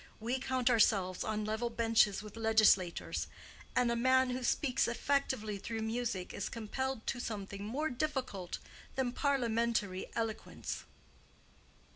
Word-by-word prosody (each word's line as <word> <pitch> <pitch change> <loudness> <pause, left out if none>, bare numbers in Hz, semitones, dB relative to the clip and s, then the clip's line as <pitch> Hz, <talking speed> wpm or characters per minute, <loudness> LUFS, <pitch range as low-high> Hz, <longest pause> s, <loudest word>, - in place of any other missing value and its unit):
We 240 +4 -1
count 255 -1 +1
ourselves 195 -5 +3
on 215 -1 -1
level 220 +3 -1
benches 225 -3 +3
with 210 -1 -10
legislators. 220 -5 +3 0.5
And 245 -1 +3
a - - +1
man 260 +1 +4
who 255 +1 -2
speaks 260 +1 +2
effectively 235 -4 0
through 225 +2 -4
music 220 -5 -2
is 200 - -3
compelled 240 +2 -3
to 245 - -1
something 200 -3 -4
more 270 +9 -1
difficult 250 - -2 0.4
than 260 -2 0
parliamentary 235 -8 0
eloquence." 225 -1 -3
230 Hz, 125 wpm, -34 LUFS, 210-255 Hz, 0.5 s, man